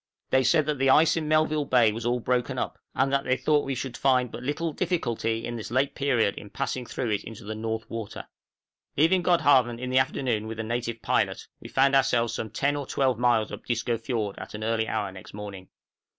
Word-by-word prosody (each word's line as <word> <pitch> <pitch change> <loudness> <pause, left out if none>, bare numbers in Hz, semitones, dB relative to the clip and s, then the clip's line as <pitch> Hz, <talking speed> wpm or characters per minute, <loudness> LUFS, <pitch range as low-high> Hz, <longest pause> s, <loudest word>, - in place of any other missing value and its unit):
They 130 0 +4
said 155 +5 +3
that 150 -2 -2
the 135 0 +3
ice 155 +3 +5
in 160 -2 -2
Melville 155 -1 +2
Bay 120 -5 +4
was 115 +2 -4
all 125 +1 +1
broken 125 +1 -1
up, - - -3 0.2
and 135 +2 +1
that 140 0 +2
they 130 +1 +1
thought 145 +3 +1
we 135 - -1
should 125 0 -5
find 125 -3 +2
but - - -7
little 150 +5 -2
difficulty 115 -11 -1
at 120 - -4
this 110 -3 -6
late 135 +4 +1
period 125 -7 +1
in 105 - -11
passing 130 +1 -3
through 120 -4 -3
it 105 - -1
into 110 -1 -10
the 105 +2 -5
North 110 0 -4
Water. 115 -3 -6
{DISCO - - -19
FIORD.} - - -40
Leaving 180 +3 +4
Godhaven 135 -9 +3
in 125 0 -4
the 130 - +5
afternoon 125 -4 0
with 115 0 -6
a - - -1
native 115 0 -3
pilot, - - 0
we - - -10
found 135 +1 +3
ourselves 120 -4 +2
some 110 - -4
10 140 +7 0
or 140 -2 -5
12 130 -4 +1
miles 120 -3 +2
up - - -7
Disco 120 0 -1
Fiord 115 -3 -3
at - - -8
an 110 - -5
early 110 0 0
hour 105 -3 -2
next 95 +1 -12
morning. 100 -3 -8
125 Hz, 230 wpm, -26 LUFS, 110-135 Hz, 0.2 s, ice